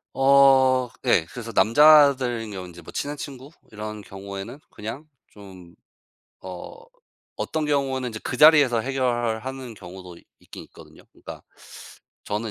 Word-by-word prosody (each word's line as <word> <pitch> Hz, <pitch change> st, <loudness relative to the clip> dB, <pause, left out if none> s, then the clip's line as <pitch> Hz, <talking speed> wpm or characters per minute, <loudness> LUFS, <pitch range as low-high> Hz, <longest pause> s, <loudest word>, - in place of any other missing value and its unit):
어. 135 Hz, -2 st, +4 dB, 0.2 s
예 80 Hz, -, +3 dB
그래서 115 Hz, -2 st, -8 dB
남자들인 130 Hz, -3 st, +4 dB
경우는 100 Hz, -, -8 dB, 0.2 s
뭐 85 Hz, -1 st, -13 dB
인제 -, -, -21 dB
친한 145 Hz, +1 st, -4 dB
친구 135 Hz, -1 st, -9 dB, 0.2 s
이런 105 Hz, 0 st, -7 dB
경우에는 100 Hz, +6 st, -9 dB
그냥 115 Hz, +8 st, -8 dB, 0.2 s
좀 95 Hz, -4 st, -15 dB, 0.7 s
어 90 Hz, -1 st, -9 dB, 0.6 s
어떤 155 Hz, -1 st, -3 dB
경우에는 135 Hz, -3 st, -1 dB
인제 110 Hz, -1 st, -7 dB
그 125 Hz, -, -4 dB
자리에서 145 Hz, -6 st, +6 dB
해결을 120 Hz, -3 st, -2 dB
하는 130 Hz, -3 st, -7 dB
경우도 90 Hz, -2 st, -12 dB, 0.2 s
있긴 -, -, -12 dB
있거든요. -, -, -17 dB
그러니까 -, -, -11 dB, 0.8 s
저는 105 Hz, +2 st, -4 dB
120 Hz, 300 characters per minute, -23 LUFS, 105-135 Hz, 0.8 s, 자리에서